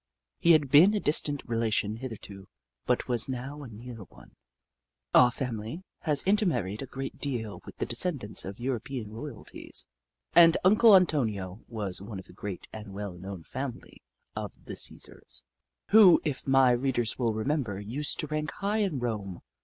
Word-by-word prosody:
He 170 -2 +6
had 145 -4 +2
been 180 +9 +7
a - - +1
distant 145 -4 0
relation 110 -3 0
hitherto, 105 -6 -9 0.4
but - - +1
was 120 +1 +1
now 135 +3 -5
a 140 - -8
near 120 +2 -9
one. - - -18 0.8
Our 125 -1 +7
family 120 - -5 0.2
has 150 -4 +1
intermarried 155 - +1
a 135 - -6
great 135 +1 -6
deal 120 -7 -4
with - - -11
the - - -1
descendants 140 - 0
of 100 +1 -7
European 120 -3 -4
royalties, 120 +1 -7 0.5
and 165 -1 +7
Uncle 215 +2 +7
Antonio 110 - +1
was 105 -6 -3
of 100 -2 -7
the - - -15
great 100 -3 -6
and 105 -3 -8
well 100 -2 -5
known 90 0 -8
family 130 - -7 0.3
of - - -7
the - - -6
Csesars, - - -7 0.5
who, 205 -5 +8
if 145 -3 -3
my 135 -1 +5
read 130 +2 0
ers 120 0 0
will 115 -3 +1
remember, 110 -3 -1
used 125 +9 -1
to - - -3
rank 155 +1 -3
high 205 +2 -1
in 195 -9 0
Rome. 105 -7 -4
125 Hz, 160 wpm, -28 LUFS, 105-150 Hz, 0.8 s, who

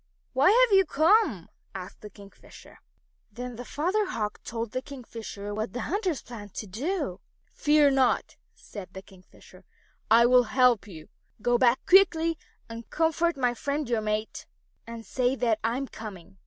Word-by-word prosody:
"Why 270 +6 +4
have 465 -1 +5
you 385 - +6
come?" 320 - +2 0.3
asked 185 -1 -8
the 210 - -9
Kingfisher. 200 -1 -16 0.5
Then 245 0 -7
the 245 - -7
Father 365 - -1
Hawk 210 - -4
told 230 -1 -5
the 255 - -3
Kingfisher 230 -7 -8
what 215 +2 -4
the 245 - -4
hunters 375 - -2
planned 205 -5 -11
to - - -5
do. 260 - -3 0.2
"Fear 295 -1 +3
not," 265 -2 +1 0.2
said 200 -4 -10
the 190 - -9
Kingfisher. 185 -2 -18 0.5
"I 230 +2 +6
will 250 0 +5
help 250 -5 +4
you. 160 -6 -12 0.3
Go 240 +2 +1
back 245 0 +3
quickly 335 -4 +4 0.3
and 230 0 -9
comfort 325 0 +1
my 250 -2 +1
friend 285 +3 -3
your 235 -2 0
mate, 215 0 -3 0.4
and 230 -1 -8
say 255 0 0
that 230 -4 0
I 230 +2 0
am 275 0 -4
coming." 195 -5 -10
245 Hz, 160 wpm, -27 LUFS, 215-300 Hz, 0.5 s, you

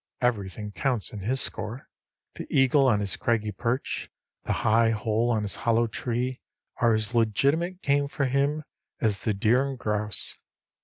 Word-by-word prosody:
Everything 105 -4 -1
counts 125 -2 -1
in 105 - -5
his 125 +7 +1
score. 120 +5 -2 0.5
The - - -8
eagle 135 +1 +4
on 105 -5 +3
his 100 -2 -2
craggy 115 -4 0
perch, 115 +6 -2 0.4
the - - -1
high 115 +1 +4
hole 110 +2 0
on 110 -3 +1
his 100 - -3
hollow 115 0 +2
tree, 125 +3 -3 0.4
are 115 -2 +3
as 110 +2 -2
legitimate 140 - +1
game 140 0 +2
for 140 0 -1
him 140 +4 +1 0.4
as 105 -3 +1
the 110 -3 -1
deer 115 +6 +3
and 135 - -5
grouse. 105 -3 0
115 Hz, 160 wpm, -26 LUFS, 105-130 Hz, 0.5 s, eagle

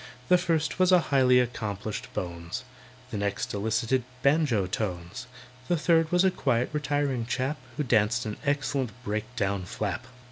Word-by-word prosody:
The 180 - +7
first 160 -1 0
was 185 0 +5
a 180 - +8
highly 130 -5 +4
accomplished 110 -4 -3
"bones," 85 +3 -4 0.5
The 105 - -3
next 100 0 -2
elicited 110 +5 0 0.2
banjo 140 - +3
tones, 90 +3 -4 0.4
The 175 - +2
third 165 0 +3
was 180 +1 +4
a 190 - +4
quiet, 130 -7 0
retiring 145 -5 0
chap, 135 +4 -1 0.2
Who 150 - +1
danced 115 -1 +2
an 105 -1 -4
excellent 140 -3 0
break 105 0 -2
down 100 -4 -1
"flap." 105 +5 -3
125 Hz, 150 wpm, -28 LUFS, 105-145 Hz, 0.5 s, a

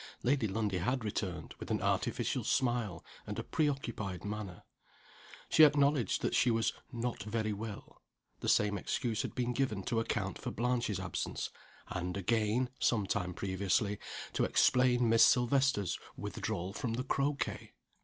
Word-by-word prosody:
Lady 130 -3 +2
Lundie 100 -2 -1
had 125 +7 0
returned 95 -5 -3
with - - -7
an - - +1
artificial - - 0
smile, 120 -8 0 0.2
and - - -4
a - - -2
preoccupied 120 - -2
manner. 105 -3 -5 0.8
She 160 - +6
acknowledged 145 -6 +4
that - - 0
she 125 - +4
was 115 -1 +2 0.2
"not 120 -1 -3
very 110 0 -1
well." 105 0 -8 0.4
The - - -1
same 105 -1 +3
excuse 115 +1 -1
had - - -5
been 125 -1 0
given 115 -7 -1
to 115 - 0
account 115 - -2
for - - -4
Blanche's 120 -4 0
absence 95 -2 -3 0.4
and, 90 +1 -3
again 110 +5 +1
(some 110 -4 +2
time 90 -3 -2
previously), 100 +2 0 0.3
to - - +1
explain 125 -1 +4
Miss 115 0 +6
Silvester's 125 - +3 0.2
withdrawal 90 +3 -3
from 115 +1 -2
the 125 +2 -1
croquet! 140 +1 -1
115 Hz, 145 wpm, -33 LUFS, 100-125 Hz, 0.8 s, She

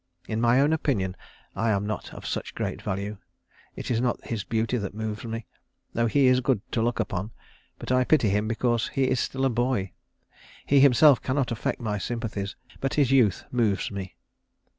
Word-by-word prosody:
In 110 0 -2
my 120 +2 +4
own 145 +3 +4
opinion 105 -12 0 0.4
I 110 +3 0
am 100 -1 +1
not 105 +1 -4
of - - -10
such - - -4
great - - -3
value. 100 +2 -3 0.6
It - - -5
is 115 -1 +1
not 125 -1 -1
his 115 -3 -3
beauty 115 +3 0
that 100 -1 -5
moves 110 0 -4
me, 115 -1 -5 0.5
though 115 0 +1
he 140 +4 +3
is 130 0 +5
good 130 -3 +2
to 115 - 0
look 120 +1 0
upon, 100 -2 -2 0.5
but - - -5
I 130 0 +4
pity 125 -5 +3
him 105 +2 +1
because 120 0 0
he 135 - -1
is 130 -1 +2
still 135 +2 -1
a - - +3
boy. 120 -5 0 0.7
He 140 - +4
himself 140 +1 +6
cannot 130 -1 0
affect 115 - -2
my 105 -4 -2
sympathies, 105 -3 -4 0.2
but 135 - -1
his 140 -4 +3
youth 120 -8 +3
moves 110 -6 +1
me." 95 -2 -6
115 Hz, 190 wpm, -26 LUFS, 105-130 Hz, 0.7 s, himself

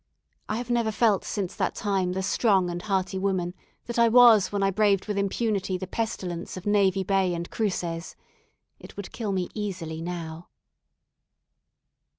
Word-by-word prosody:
I 215 - -1
have 245 0 -4
never 235 -2 +1
felt 215 -3 +2
since 195 -3 -3
that - - -1
time 195 -4 0
the 190 +1 -2
strong 190 -3 +2
and 175 0 -4
hearty 190 -1 -1
woman 185 -2 -1 0.3
that 235 0 -3
I 235 0 +6
was 230 -4 +7
when 200 -1 0
I 195 - +3
braved 200 -1 +2
with 210 - -2
impunity 200 -1 -1
the 185 - -5
pestilence 185 -5 -4
of 185 - -8
Navy 195 -2 +3
Bay 190 -2 +1
and 170 0 -4
Cruces. 175 -6 -2 0.6
It - - -13
would 200 - -7
kill 220 -4 -3
me 185 -2 -1
easily 175 -7 -4
now. 165 -1 -6
195 Hz, 165 wpm, -26 LUFS, 180-210 Hz, 0.6 s, was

